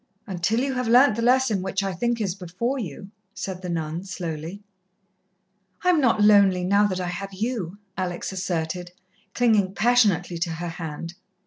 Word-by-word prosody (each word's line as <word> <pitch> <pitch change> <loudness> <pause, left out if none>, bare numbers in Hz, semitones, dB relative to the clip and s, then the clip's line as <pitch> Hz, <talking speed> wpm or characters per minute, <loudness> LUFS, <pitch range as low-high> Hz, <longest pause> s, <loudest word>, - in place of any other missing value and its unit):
"Until 195 +5 0
you 270 0 -1
have 250 -2 -2
learnt 245 +1 +6
the 230 - -2
lesson 245 -4 +3
which 190 +1 -2
I 195 -1 -2
think 235 +6 -1
is 195 -5 -1
before 195 +9 -3
you," 195 - -7 0.2
said 185 -1 -5
the 180 - -5
nun 165 0 -3
slowly. 175 0 -6 1.2
"I 360 - +3
am 340 -4 +4
not 230 -5 +3
lonely 200 -3 +5
now 200 +3 +4
that 185 -2 -3
I 180 -1 -2
have 195 +2 -6
you," 205 -3 -3 0.2
Alex 180 -1 -3
asserted, 180 -1 -3 0.4
clinging 215 -6 +2
passionately 205 -8 +2
to 170 -1 -1
her 175 +1 -4
hand. 165 0 -6
190 Hz, 165 wpm, -24 LUFS, 175-225 Hz, 1.2 s, learnt